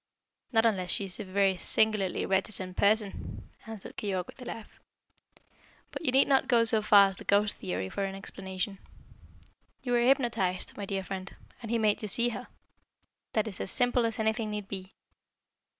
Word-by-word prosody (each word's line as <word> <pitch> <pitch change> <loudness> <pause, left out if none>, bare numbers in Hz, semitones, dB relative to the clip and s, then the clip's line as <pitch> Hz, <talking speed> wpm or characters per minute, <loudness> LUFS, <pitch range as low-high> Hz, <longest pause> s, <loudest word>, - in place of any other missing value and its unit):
"Not 225 -2 +3
unless 190 -5 +1
she 200 - +1
is 185 - -1
a - - -3
very 195 0 +2
singularly 210 -2 +1
reticent 190 -1 -1
person," 205 0 0 0.2
answered 220 -3 -8
Keyork, 190 -4 -2
with 260 - -14
a - - -8
laugh. 225 -2 -8 1.1
"But - - -6
you 265 - +2
need 270 +2 +5
not 270 -1 +3
go 235 -3 +4
so 220 -1 +1
far 200 -2 +7
as 195 - -6
the - - -10
ghost 205 +1 +3
theory 95 +1 -3
for 200 - -3
an 195 0 -3
explanation. 190 0 -5 1.0
You 250 - -3
were 240 -1 +3
hypnotised, 235 -8 +1
my 200 -1 -6
dear 195 -1 -2
friend, 190 0 -6 0.3
and 230 - -7
he 235 - +1
made 215 -2 +2
you 215 - -3
see 235 +4 +1
her. 235 - -6 0.9
That 215 0 +1
is 200 - -6
as - - -3
simple 245 0 +2
as 225 - -5
anything 220 0 0
need 210 -2 -4
be." 190 -1 -7
210 Hz, 180 wpm, -29 LUFS, 190-225 Hz, 1.1 s, far